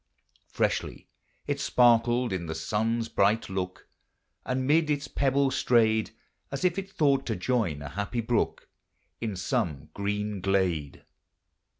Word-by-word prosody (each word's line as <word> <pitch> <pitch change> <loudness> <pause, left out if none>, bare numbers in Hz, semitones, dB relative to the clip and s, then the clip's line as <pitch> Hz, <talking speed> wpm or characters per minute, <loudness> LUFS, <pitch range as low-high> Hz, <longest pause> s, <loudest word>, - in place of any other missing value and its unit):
Freshly - - -2 0.4
it - - -2
sparkled 120 -1 +3
in 85 -3 -3
the 80 - -4
sun's 110 +7 -1
bright 105 0 +1
look, 90 -1 -4 0.6
And 130 0 -1
mid 155 +2 +3
its 145 -1 -1
pebbles 135 0 +1
strayed, 110 -2 +3 0.4
As 140 +6 -2
if 180 +1 +2
it 195 0 -7
thought 140 -6 +2
to 110 - 0
join 90 - -1
a 70 - -6
happy 100 - -3
brook 115 0 -1 0.5
In 110 -4 -3
some 75 -4 -2
green 105 0 -2
glade. 90 -7 0
110 Hz, 130 wpm, -28 LUFS, 95-130 Hz, 0.6 s, sparkled